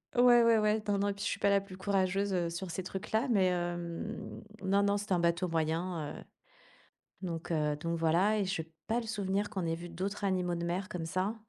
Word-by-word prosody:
ouais, 245 -1 +7
ouais, 230 -1 +5
ouais, 215 0 +2
non, 205 - +2
non, 205 - +1
et - - 0
puis 200 +1 -7
je - - +1
suis - - -3
pas 200 - +3
la 200 - +5
plus 195 -1 -10
courageuse, 195 0 0
heu, 175 -2 +1
sur 175 +1 -5
ces 190 - -3
trucs-là, 220 +7 -1
mais 195 -5 +4
hem, 175 -1 -3 0.2
non, 200 +1 +3
non, 200 0 +3
c'était 205 -1 -2
un 180 - +3
bateau 170 +1 +1
moyen, 165 0 -1
heu, - - -10 1.0
donc 170 -3 -4
heu, 150 -2 +1
donc 170 +2 -2
voilà 180 +7 +3
et 200 - +1
j'ai 165 -4 -3 0.2
pas 235 +2 +1
le 230 - -8
souvenir 205 -1 -1
qu'on 190 -4 -3
ait 165 0 0
vu 175 +1 -8
d'autres 195 +4 -4
animaux 180 -2 +1
de 170 - -3
mer 180 +3 -2
comme 180 -5 -4
ça. 185 +6 -1
185 Hz, 230 wpm, -32 LUFS, 170-200 Hz, 1.0 s, ouais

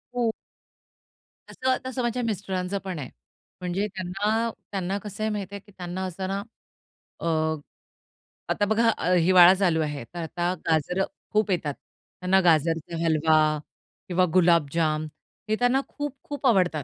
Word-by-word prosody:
हो. 235 -2 +2 1.2
तसं 260 0 0
तसं 260 0 -3
माझ्या 240 +1 -1
मिस्टरांच 190 -3 -2
पण 185 -5 -4
आहे. 130 - -6 0.5
म्हणजे 180 +3 -1
त्यांना 205 +4 -1 0.2
त्यांना 195 0 -1
कसं 210 +1 -6
आहे 220 - +1
माहिती 200 -1 -4
आहे, - - -5
की 205 - -18
त्यांना 180 +1 -4
असं 185 +1 -4
ना 195 +1 -2 0.8
अ, - - -6 1.3
आता 205 - +2
बघा 225 +2 +3 0.3
हिवाळा 180 +1 +7
चालू 175 -5 +2
आहे, 150 -4 -3
तर 175 - -9
आता 175 +2 -1
गाजरं 175 +4 +1 0.3
खूप 210 -1 +2
येतात. 155 -5 0
त्यांना 185 +1 -2
गाजरचा 165 0 +2
हलवा 160 0 +3 0.7
किंवा 180 0 +3
गुलाबजाम 165 -3 +3 0.4
हे 215 - +3
त्यांना 245 +2 +3
खूप-खूप 290 0 -6
आवडतात. 180 - +3
185 Hz, 135 wpm, -26 LUFS, 170-210 Hz, 1.3 s, हिवाळा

